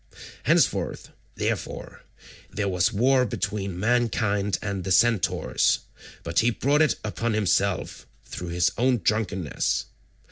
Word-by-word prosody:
Henceforth, -, -, +1 dB, 0.2 s
therefore, -, -, -4 dB, 0.5 s
there 105 Hz, -1 st, -2 dB
was 90 Hz, +3 st, +1 dB
war 130 Hz, +4 st, +3 dB
between 100 Hz, -5 st, -3 dB
mankind 105 Hz, -3 st, +1 dB
and 100 Hz, -3 st, -4 dB
the 95 Hz, -, -3 dB
centaurs, 110 Hz, 0 st, +2 dB, 0.4 s
but 85 Hz, 0 st, 0 dB
he 115 Hz, -, +3 dB
brought 140 Hz, +5 st, +1 dB
it 155 Hz, -, +3 dB
upon 115 Hz, +2 st, -2 dB
himself 100 Hz, -2 st, 0 dB, 0.2 s
through 90 Hz, -, -7 dB
his 85 Hz, +1 st, +1 dB
own 125 Hz, 0 st, +3 dB
drunkenness. 100 Hz, -5 st, -1 dB
105 Hz, 115 wpm, -25 LUFS, 95-120 Hz, 0.5 s, war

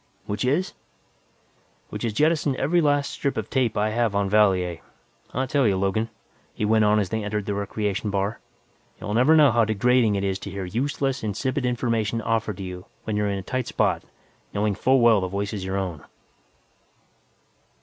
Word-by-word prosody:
"Which 105 Hz, -1 st, -3 dB
is?" 145 Hz, +9 st, 0 dB, 1.2 s
"Which -, -, -6 dB
is 115 Hz, -, 0 dB
jettison 150 Hz, +1 st, +2 dB
every 170 Hz, +6 st, +2 dB
last 145 Hz, -2 st, +1 dB
strip 140 Hz, -, -2 dB
of -, -, -4 dB
tape 125 Hz, -5 st, +1 dB
I 105 Hz, +1 st, +1 dB
have 115 Hz, -2 st, 0 dB
in 100 Hz, -1 st, 0 dB
Valier. 95 Hz, -5 st, +3 dB, 0.5 s
I 130 Hz, +2 st, -1 dB
tell 135 Hz, -1 st, +2 dB
you, 95 Hz, -2 st, +2 dB
Logan," 100 Hz, +4 st, 0 dB, 0.5 s
he 105 Hz, -, -1 dB
went 110 Hz, 0 st, +3 dB
on 105 Hz, +1 st, +4 dB
as 100 Hz, -4 st, 0 dB
they 110 Hz, +1 st, -2 dB
entered 105 Hz, 0 st, -2 dB
the 100 Hz, -, -2 dB
recreation 100 Hz, +1 st, -2 dB
bar, 100 Hz, +2 st, -1 dB, 0.6 s
"you'll 105 Hz, -, -4 dB
never 130 Hz, +8 st, +5 dB
know 150 Hz, -4 st, +6 dB
how 115 Hz, 0 st, +3 dB
degrading 110 Hz, +1 st, +2 dB
it 100 Hz, -, -1 dB
is 95 Hz, -1 st, -1 dB
to -, -, -7 dB
hear 95 Hz, 0 st, -5 dB
useless, 135 Hz, +5 st, -1 dB
insipid 125 Hz, +5 st, -1 dB
information 115 Hz, -2 st, 0 dB
offered 110 Hz, -3 st, -1 dB
to 95 Hz, -, -6 dB
you 90 Hz, +2 st, -7 dB, 0.2 s
when 110 Hz, -, -3 dB
you're 105 Hz, 0 st, +1 dB
in 100 Hz, -, -1 dB
a 95 Hz, -, -5 dB
tight 130 Hz, +5 st, -3 dB
spot, -, -, +1 dB, 0.5 s
knowing 105 Hz, 0 st, +1 dB
full 130 Hz, +6 st, +2 dB
well 115 Hz, -4 st, +5 dB
the 95 Hz, -, -1 dB
voice 100 Hz, +3 st, -3 dB
is 100 Hz, -3 st, -4 dB
your 95 Hz, +1 st, -2 dB
own!" 90 Hz, -6 st, -4 dB
110 Hz, 190 wpm, -24 LUFS, 100-125 Hz, 1.2 s, know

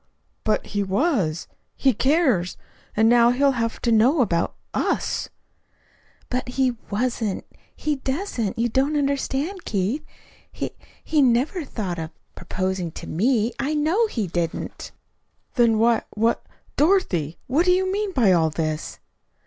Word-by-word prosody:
"But 215 Hz, -, +1 dB
he 205 Hz, -, -2 dB
was. 195 Hz, -, 0 dB, 0.3 s
He 265 Hz, -2 st, +3 dB
cares. 260 Hz, -, +2 dB, 0.4 s
And 220 Hz, +1 st, +5 dB
now 235 Hz, 0 st, +6 dB
he'll 275 Hz, +3 st, +3 dB
have 230 Hz, -3 st, -2 dB
to 235 Hz, -, +2 dB
know 250 Hz, +7 st, +4 dB
about 170 Hz, -8 st, 0 dB, 0.2 s
us." -, -, -1 dB, 1.0 s
"But 250 Hz, 0 st, -2 dB
he 260 Hz, 0 st, +2 dB, 0.2 s
wasn't 225 Hz, -2 st, -1 dB, 0.3 s
he 300 Hz, -2 st, -1 dB
doesn't. 265 Hz, -, -2 dB
You 235 Hz, +1 st, +2 dB
don't 270 Hz, +5 st, +1 dB
understand, 280 Hz, +5 st, -1 dB
Keith. 210 Hz, +9 st, -1 dB, 0.5 s
He -, -, -4 dB, 0.3 s
he 310 Hz, -2 st, +2 dB
never 265 Hz, +7 st, +2 dB
thought 195 Hz, -, -4 dB
of 160 Hz, -, -2 dB
of -, -, -10 dB, 0.2 s
proposing 185 Hz, 0 st, -3 dB
to -, -, -8 dB
me. 225 Hz, +5 st, +1 dB
I 285 Hz, +3 st, 0 dB
know 330 Hz, +10 st, +2 dB
he 225 Hz, -, -2 dB
didn't." 170 Hz, -2 st, -4 dB, 0.6 s
"Then 235 Hz, -3 st, +4 dB
why 230 Hz, +1 st, +3 dB
what 225 Hz, +2 st, +1 dB, 0.3 s
Dorothy, 200 Hz, -, +2 dB
what 295 Hz, +8 st, +2 dB
do 360 Hz, -, +5 dB
you 375 Hz, +1 st, +2 dB
mean 410 Hz, 0 st, -1 dB
by 235 Hz, -, +4 dB
all 165 Hz, -3 st, +4 dB
this?" 155 Hz, 0 st, -3 dB
240 Hz, 140 wpm, -23 LUFS, 200-285 Hz, 1.0 s, now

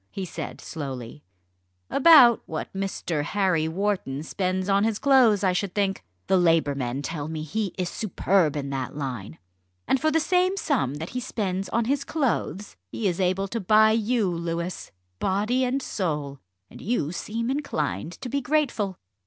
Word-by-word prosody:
he 195 Hz, -, -5 dB
said 170 Hz, -, -6 dB
slowly; 135 Hz, -3 st, -7 dB, 0.6 s
"about 275 Hz, -6 st, +7 dB
what 160 Hz, -2 st, -5 dB
Mr. 190 Hz, -5 st, -2 dB
Harry 180 Hz, -1 st, +1 dB
Wharton 175 Hz, -6 st, -2 dB
spends 185 Hz, +2 st, -2 dB
on 200 Hz, 0 st, +3 dB
his 220 Hz, -1 st, +1 dB
clothes, 245 Hz, -8 st, +4 dB
I 185 Hz, -1 st, +3 dB
should 185 Hz, 0 st, -2 dB
think. 195 Hz, -, 0 dB, 0.2 s
The 190 Hz, -, +3 dB
Labour 165 Hz, -4 st, +3 dB
men 135 Hz, 0 st, -3 dB
tell 150 Hz, -1 st, -4 dB
me 155 Hz, -1 st, -4 dB
he 195 Hz, +5 st, -3 dB
is 180 Hz, -2 st, -1 dB
superb 185 Hz, -5 st, +1 dB
in 140 Hz, -1 st, -3 dB
that 135 Hz, -1 st, -4 dB
line. 125 Hz, -, -5 dB, 0.5 s
And 265 Hz, -, +2 dB
for 315 Hz, -, +3 dB
the 320 Hz, +1 st, +2 dB
same 365 Hz, +3 st, +2 dB
sum 245 Hz, -, 0 dB
that 160 Hz, +3 st, -6 dB
he 250 Hz, -, -3 dB
spends 195 Hz, -6 st, -3 dB
on 230 Hz, 0 st, 0 dB
his 280 Hz, +3 st, 0 dB
clothes, 225 Hz, -, -2 dB, 0.2 s
he 215 Hz, -, -1 dB
is 175 Hz, -1 st, -1 dB
able 190 Hz, +1 st, +1 dB
to 230 Hz, -, -2 dB
buy 215 Hz, +2 st, +5 dB
you, 225 Hz, -1 st, +1 dB
Louis, 170 Hz, 0 st, -3 dB, 0.3 s
body 215 Hz, +7 st, +1 dB
and 260 Hz, +2 st, 0 dB
soul, 150 Hz, -7 st, -3 dB, 0.3 s
and -, -, -13 dB
you 200 Hz, -9 st, -1 dB
seem 230 Hz, +6 st, -3 dB
inclined 160 Hz, -, -2 dB
to -, -, -4 dB
be 280 Hz, +3 st, -1 dB
grateful." 245 Hz, -9 st, 0 dB
195 Hz, 170 wpm, -25 LUFS, 160-230 Hz, 0.6 s, about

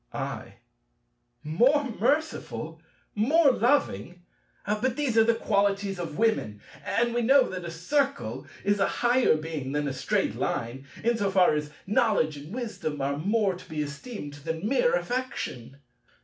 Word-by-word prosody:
I. -, -, -5 dB, 0.9 s
"More 245 Hz, -, +3 dB
merciful, 275 Hz, +7 st, -2 dB, 0.3 s
more 280 Hz, +8 st, +4 dB
loving!" 180 Hz, -, 0 dB, 0.4 s
But 215 Hz, +5 st, 0 dB
these 280 Hz, -5 st, -1 dB
are 225 Hz, -, +7 dB
the 230 Hz, 0 st, +3 dB
qualities 200 Hz, -3 st, 0 dB
of 165 Hz, -3 st, -5 dB
women! 215 Hz, -, +1 dB, 0.2 s
And 235 Hz, +9 st, 0 dB
we 240 Hz, -, +1 dB
know 265 Hz, +2 st, +5 dB
that 180 Hz, -2 st, -5 dB
a -, -, -4 dB
Circle 275 Hz, -, -1 dB, 0.2 s
is 205 Hz, 0 st, +1 dB
a 195 Hz, -, +3 dB
higher 245 Hz, -5 st, +3 dB
Being 155 Hz, -4 st, -5 dB
than 145 Hz, 0 st, 0 dB
a 135 Hz, -, -2 dB
Straight 130 Hz, -, 0 dB
Line, 130 Hz, +4 st, -3 dB, 0.2 s
in 235 Hz, +1 st, +2 dB
so 200 Hz, -2 st, 0 dB
far 190 Hz, -3 st, +4 dB
as 150 Hz, 0 st, -2 dB, 0.2 s
knowledge 200 Hz, -7 st, +2 dB
and 145 Hz, +3 st, -10 dB
wisdom 220 Hz, -, -4 dB
are 140 Hz, +1 st, 0 dB
more 200 Hz, +5 st, +1 dB
to 180 Hz, +1 st, -12 dB
be 155 Hz, -1 st, -2 dB
esteemed 150 Hz, -, -7 dB
than 160 Hz, +6 st, -4 dB
mere 485 Hz, -, +3 dB
affection. 245 Hz, -, -4 dB
200 Hz, 150 wpm, -27 LUFS, 155-240 Hz, 0.9 s, are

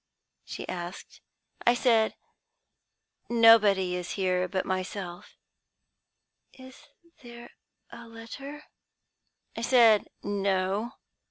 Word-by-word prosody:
she -, -, -8 dB
asked. 175 Hz, 0 st, -8 dB, 0.4 s
"I 240 Hz, -, +4 dB
said, 230 Hz, -3 st, +2 dB, 1.1 s
'Nobody 210 Hz, -6 st, +5 dB
is 180 Hz, -1 st, -5 dB
here 185 Hz, -2 st, 0 dB
but 190 Hz, 0 st, -3 dB
myself.' 185 Hz, -1 st, -5 dB, 1.2 s
"'Is 260 Hz, 0 st, -15 dB, 0.3 s
there 240 Hz, -1 st, -12 dB, 0.4 s
a 235 Hz, 0 st, -11 dB
letter?' 270 Hz, +6 st, -10 dB, 0.9 s
"I -, -, -5 dB
said 230 Hz, -3 st, +4 dB, 0.2 s
'No.' 200 Hz, +2 st, -1 dB
215 Hz, 85 wpm, -27 LUFS, 185-235 Hz, 1.2 s, Nobody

